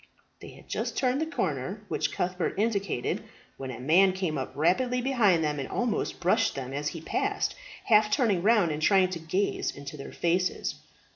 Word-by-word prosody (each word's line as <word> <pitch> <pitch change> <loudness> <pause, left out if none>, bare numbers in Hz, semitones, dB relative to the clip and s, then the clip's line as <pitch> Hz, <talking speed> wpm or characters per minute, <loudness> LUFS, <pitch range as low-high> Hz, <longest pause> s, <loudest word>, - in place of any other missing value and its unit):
They - - -10
had - - -15
just - - -3
turned 260 +2 +1
the 320 - 0
corner 185 - -3
which - - -1
Cuthbert 180 0 -2
indicated, 200 - -1 0.3
when 135 -1 -6
a 125 - -6
man 180 +8 +4
came 185 -4 -2
up 130 -2 -3
rapidly 245 - +2
behind 230 -10 +3
them 150 -1 -1
and 135 - -4
almost 235 -3 -1
brushed 180 +1 +2
them 135 -1 -5
as 145 +1 -2
he 165 +1 -4
passed, - - -1 0.3
half 215 -2 +4
turning 210 - +2
round 205 -4 +4
and 150 +1 -3
trying 190 +1 +4
to 170 - -4
gaze 180 +5 -1
into 140 +1 -7
their 140 - -8
faces. 180 +2 0
185 Hz, 185 wpm, -28 LUFS, 150-210 Hz, 0.3 s, man